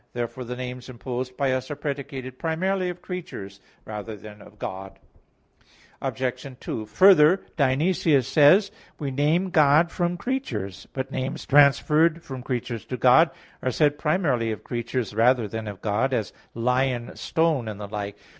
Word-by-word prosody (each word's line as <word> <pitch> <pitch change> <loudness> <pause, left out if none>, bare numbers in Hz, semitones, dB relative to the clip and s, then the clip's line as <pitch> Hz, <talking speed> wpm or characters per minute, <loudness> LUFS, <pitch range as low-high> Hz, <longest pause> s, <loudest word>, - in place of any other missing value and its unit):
Therefore 120 +2 -4
the 125 +1 -5
names 125 0 -6
imposed 125 +1 -5
by 140 -2 +1
us 130 0 -2
are 145 - -3
predicated 140 -3 -5
primarily 180 +3 0
of 180 0 -8
creatures 100 - -7 0.3
rather 105 0 -6
than 105 +1 -12
of 105 - -16
God. 95 -1 -7 1.0
Obj. 130 0 -3
2: 110 - -5
Further, 185 - +6
Dionysius 140 -1 +2
says 155 +8 +5
(Div. - - -30
Nom. - - -25
i): - - -26
"We 140 - -2
name 155 +7 +1
God 155 +2 +4
from 175 0 -1
creatures." 120 - -4
But 135 0 -4
names 135 +5 -4
transferred 150 +4 +4
from 130 -2 -7
creatures 120 -3 -4
to 125 - -5
God, 130 +8 +6 0.3
are 130 - 0
said 145 +3 +2
primarily 150 -8 +1
of 110 - -6
creatures 120 -2 -3
rather 115 +1 +3
than 110 +1 -5
of 100 -1 -7
God, 115 +5 +1
as 110 - -3 0.2
"lion," 125 0 0
"stone," 160 -7 0
and 105 -2 -6
the 105 - -6
like. 100 -1 -5
130 Hz, 165 wpm, -25 LUFS, 115-155 Hz, 1.0 s, Further